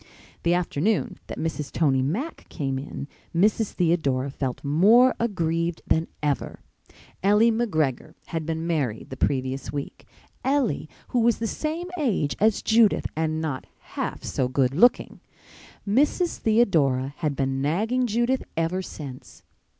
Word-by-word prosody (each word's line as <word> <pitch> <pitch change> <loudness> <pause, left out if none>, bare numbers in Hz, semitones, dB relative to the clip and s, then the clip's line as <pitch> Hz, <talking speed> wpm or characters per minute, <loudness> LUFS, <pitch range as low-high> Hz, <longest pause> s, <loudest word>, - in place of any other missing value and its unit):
The 170 +1 +2
afternoon 180 +3 0
that - - -6
Mrs. 155 -3 -3
Tony 135 -5 +2
Mack 215 - -3
came 135 -2 -2
in 140 0 -7 0.3
Mrs. 210 +4 +2
Theodora 140 -7 +1
felt 135 -2 -4
more 205 - +5
aggrieved 170 -6 -1
than 160 +1 +1 0.2
ever. 145 -2 -2 0.6
Ellie 210 +4 +5
McGregor 160 - -1
had 165 -1 -2
been 160 +1 -3
married 140 -12 -2
the - - -4
previous 130 0 -1
week—Ellie, 240 - -3 0.2
who 245 - +1
was 235 -1 +3
the 230 - -3
same 320 +9 -3
age 205 - 0
as 215 0 +2
Judith 225 -1 +4
and 160 0 -1
not 150 -5 -4 0.3
half - - -3
so 130 - -1
good 130 0 +1
looking. 240 - +3 0.7
Mrs. 295 - +2
Theodora 145 - +2
had 150 -4 -1
been 135 0 -1
nagging 220 - +1
Judith 240 +4 +1 0.2
ever 165 +3 0
since. 140 -8 -9
165 Hz, 135 wpm, -25 LUFS, 140-225 Hz, 0.7 s, more